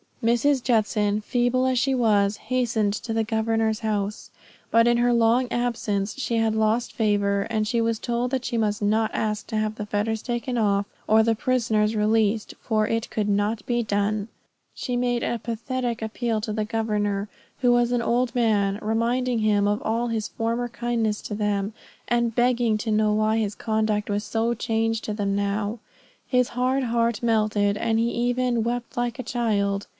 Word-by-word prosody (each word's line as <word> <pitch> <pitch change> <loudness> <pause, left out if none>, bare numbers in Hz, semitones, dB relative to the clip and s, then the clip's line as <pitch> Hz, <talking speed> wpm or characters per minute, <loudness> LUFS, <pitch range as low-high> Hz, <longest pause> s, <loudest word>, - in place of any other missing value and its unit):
Mrs. 245 +4 +3
Judson, 210 -3 +1
feeble 245 +3 +1
as 260 -1 +2
she 270 +1 +1
was, 210 -4 +2
hastened 235 -5 0
to 225 +2 -5
the 225 0 +1
governor's 220 0 0
house. 210 -2 -2 0.4
But 230 +1 +4
in 240 0 +4
her 240 0 +3
long 235 +2 +3
absence 220 -4 -1
she 245 -4 -2
had 225 -1 +2
lost 220 +2 +1
favor; 200 -2 +1
and 215 -2 0
she 235 +1 +1
was 230 0 0
told 240 +2 -1
that 260 -1 -2
she - - -2
must 210 -2 0
not 215 +1 +2
ask 210 -1 -1
to 220 - -3
have 215 0 -1
the 210 - -5
fetters 210 +1 -1
taken 240 0 -2
off, 200 -2 +2 0.2
or 220 +1 +5
the 230 0 +2
prisoners 220 -2 +1
released, 215 0 +1
for 215 -2 0
it 225 0 -1
could 210 -2 -1
not 205 +2 0
be 240 -1 0
done. 205 -1 -1 0.5
She 250 - -3
made 245 -1 0
a 235 - -1
pathetic 235 +1 -3
appeal 225 0 -1
to 215 -1 -3
the 215 0 -1
governor, 210 -2 -1 0.3
who 245 -2 +4
was 240 0 +3
an 245 -1 +1
old 245 0 +1
man, 205 -4 +2
reminding 235 +3 0
him 205 -2 +2
of 205 +1 0
all 230 +2 0
his 225 -2 -2
former 230 +2 -2
kindness 230 -3 -1
to 210 - -4
them, 205 0 -1 0.3
and 235 -1 +1
begging 240 -2 +2
to 220 +1 -2
know 215 0 +3
why 215 +1 +2
his 210 -2 -1
conduct 215 -1 0
was 205 0 -1
so 225 +2 0
changed 225 -1 -1
to 210 - -2
them 200 -2 -1
now. 205 +2 -1 0.5
His 250 -2 +2
hard 255 +2 0
heart 235 -1 0
melted 215 -3 +2
and 225 0 0
he 230 +1 +2
even 245 -1 0
"wept 240 +1 -3
like 240 -1 -1
a 255 - -4
child." 205 -5 -1
225 Hz, 180 wpm, -24 LUFS, 210-240 Hz, 0.5 s, or